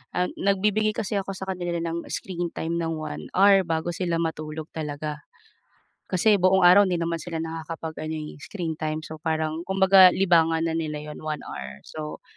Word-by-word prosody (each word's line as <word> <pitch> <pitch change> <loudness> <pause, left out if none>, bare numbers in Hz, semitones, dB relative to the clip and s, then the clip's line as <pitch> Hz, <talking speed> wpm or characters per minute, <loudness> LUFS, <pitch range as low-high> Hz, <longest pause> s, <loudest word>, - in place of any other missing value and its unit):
ah, 180 0 +2
nagbibigay 210 +2 +1
kasi 205 -1 -1
ako 195 0 -5
sa 190 0 -7
kanila 175 -2 -3
ng 170 0 -4
screen 175 -2 -3
time 170 +1 -2
ng 165 -1 -1
1 75 - -6
hour, 195 0 +6
bago 165 +1 -1
sila 170 -1 -1
matulog 155 -1 -4
talaga. 150 -1 -4 0.9
Kasi 205 +4 +4
buong 185 +1 +4
araw 185 +3 +8
'di 175 -2 0
naman 165 0 -1
sila 165 -2 -5
nakakapag-ano 160 -1 -5
eh, 155 -1 -6
screen 170 -5 -4
time, 155 0 -2
so 160 0 -8
parang, 160 0 -1
kumbaga 190 -1 +7
libangan 165 -3 +3
na 160 - -1
nila 155 -2 -2
'yon, - - -8
1 155 -1 -4
hour. 65 0 -8
So, 155 -1 -7
165 Hz, 175 wpm, -25 LUFS, 155-185 Hz, 0.9 s, araw